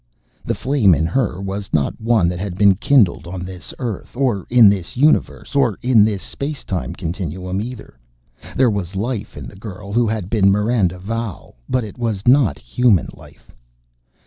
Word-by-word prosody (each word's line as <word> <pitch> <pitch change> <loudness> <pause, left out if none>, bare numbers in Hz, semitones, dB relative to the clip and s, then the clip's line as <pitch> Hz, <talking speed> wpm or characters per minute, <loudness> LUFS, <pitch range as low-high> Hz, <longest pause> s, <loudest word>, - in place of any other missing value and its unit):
The - - -2
flame 125 - +3
in 80 - 0
her 95 0 -1
was 100 +1 -5
not 75 +7 0
one 110 -6 +3
that 90 0 -4
had 95 -2 -5
been 100 -1 +6
kindled 105 -4 +2
on 90 0 -6
this 90 -2 -8
earth, 120 -1 -6
or 125 -8 0
in 120 -3 +7
this 100 +1 0
universe, 150 +2 +1
or 125 -8 +2
in 120 -4 +5
this 105 -3 -1
space 145 +1 -5
time 90 -2 -4
continuum, 90 +1 -4
either. 110 - -9 0.6
There 130 -3 +4
was 100 -2 -4
life 105 - -4
in 70 - -7
the - - -11
girl 100 0 -9
who 120 0 +2
had 105 -4 -2
been 100 -2 +3
Miranda 105 -3 +1
Valle 110 0 -5 0.2
but 130 -1 +1
it 105 +2 -9
was 110 -4 -2
not 125 - +4
human 100 - +1
life! - - -17
100 Hz, 175 wpm, -19 LUFS, 90-120 Hz, 0.6 s, in